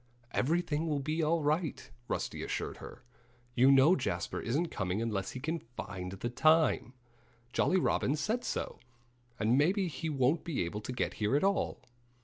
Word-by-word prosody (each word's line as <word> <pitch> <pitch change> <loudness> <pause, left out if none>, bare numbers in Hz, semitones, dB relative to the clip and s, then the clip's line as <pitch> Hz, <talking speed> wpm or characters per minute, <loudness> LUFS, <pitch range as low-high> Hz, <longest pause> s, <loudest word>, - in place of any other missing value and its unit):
"Everything 160 +3 0
will 150 -2 0
be 155 +4 -1
all 160 +1 +1
right," 155 +1 -1 0.2
Rusty - - -3
assured - - -3
her. - - -11 0.5
"You 130 +2 +5
know 140 +6 +7
Jasper 135 - -2
isn't 150 +9 -1
coming 95 +1 -2
unless 105 -4 -2
he 130 - -5
can 160 +5 -2
find 95 -7 -7
the 110 +5 -3
time. 155 -2 +3 0.6
Jolly 185 - +3
Robin 145 -4 +1
said 215 +11 -1
so. - - -3 0.6
And 115 +5 +3
maybe 185 +6 +2
he 160 0 -4
won't 140 +2 +2
be 150 - -1
able 105 +5 -4
to 115 - -5
get 125 - -1
here 105 +5 +2
at 145 - +2
all." 195 0 0
145 Hz, 165 wpm, -32 LUFS, 120-165 Hz, 0.6 s, know